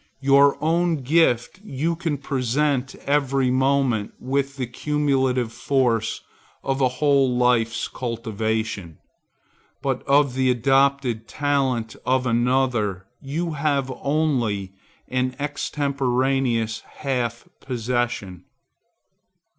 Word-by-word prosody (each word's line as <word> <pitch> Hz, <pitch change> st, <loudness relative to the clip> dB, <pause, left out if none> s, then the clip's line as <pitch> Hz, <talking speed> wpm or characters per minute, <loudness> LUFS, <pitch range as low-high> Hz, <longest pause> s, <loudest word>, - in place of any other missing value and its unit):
Your 140 Hz, +1 st, +5 dB
own 165 Hz, -2 st, +1 dB
gift 140 Hz, 0 st, +2 dB
you 165 Hz, -1 st, -2 dB
can 165 Hz, -3 st, -2 dB
present 135 Hz, 0 st, -1 dB
every 135 Hz, -2 st, +2 dB
moment 130 Hz, -5 st, +1 dB
with 140 Hz, +2 st, -2 dB
the 130 Hz, -, -1 dB
cumulative 130 Hz, -2 st, 0 dB
force 120 Hz, -5 st, 0 dB, 0.4 s
of 135 Hz, 0 st, -1 dB
a 130 Hz, -, +5 dB
whole 135 Hz, -1 st, +2 dB
life's 120 Hz, -2 st, +2 dB
cultivation; 110 Hz, -6 st, -3 dB, 0.8 s
but 135 Hz, -2 st, -1 dB
of 140 Hz, -1 st, +4 dB
the 130 Hz, 0 st, +1 dB
adopted 135 Hz, -2 st, +2 dB
talent 135 Hz, -6 st, -1 dB
of 130 Hz, 0 st, +1 dB
another 120 Hz, -5 st, +1 dB, 0.2 s
you 160 Hz, +5 st, -3 dB
have 140 Hz, -3 st, 0 dB
only 120 Hz, -11 st, 0 dB, 0.3 s
an 130 Hz, 0 st, -1 dB
extemporaneous 135 Hz, -5 st, 0 dB
half 120 Hz, -3 st, -4 dB
possession. 120 Hz, -7 st, -3 dB
130 Hz, 95 wpm, -23 LUFS, 120-140 Hz, 0.8 s, Your